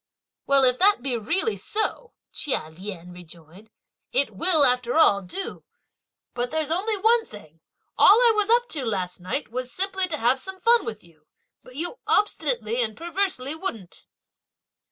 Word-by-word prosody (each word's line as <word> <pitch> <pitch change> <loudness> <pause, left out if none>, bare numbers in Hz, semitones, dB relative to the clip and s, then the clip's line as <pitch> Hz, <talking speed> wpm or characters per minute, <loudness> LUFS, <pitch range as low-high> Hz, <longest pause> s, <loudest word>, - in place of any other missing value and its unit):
"Well 275 -1 +4
if 250 -1 +3
that 400 -9 +4
be 265 -3 -1
really 330 - -1
so," 450 +2 -3 0.2
Chia 260 - -1
Lien 180 0 -9
rejoined, 175 +3 -15 0.4
"it - - 0
will 335 -4 +4
after 250 -1 +2
all 200 -11 +5
do! 285 - -7 0.7
But 245 0 -3
there's 315 +2 -2
only 410 +5 0
one 455 +3 +3
thing; 165 - -15 0.4
all 400 - +8
I 485 -2 +5
was 420 0 0
up 480 +1 +3
to 290 -4 -3
last 185 -6 -3
night 185 +9 -4
was 255 +1 -5
simply 380 +3 -1
to 320 -3 -4
have 250 +1 +2
some 380 +5 -5
fun 470 +4 +3
with 215 -1 -7
you, 155 -3 -24 0.3
but 255 - -16
you 350 - -5
obstinately 250 - +1
and 220 -2 -2
perversely 340 -5 -2
wouldn't." 230 - -7
270 Hz, 160 wpm, -24 LUFS, -, 0.7 s, all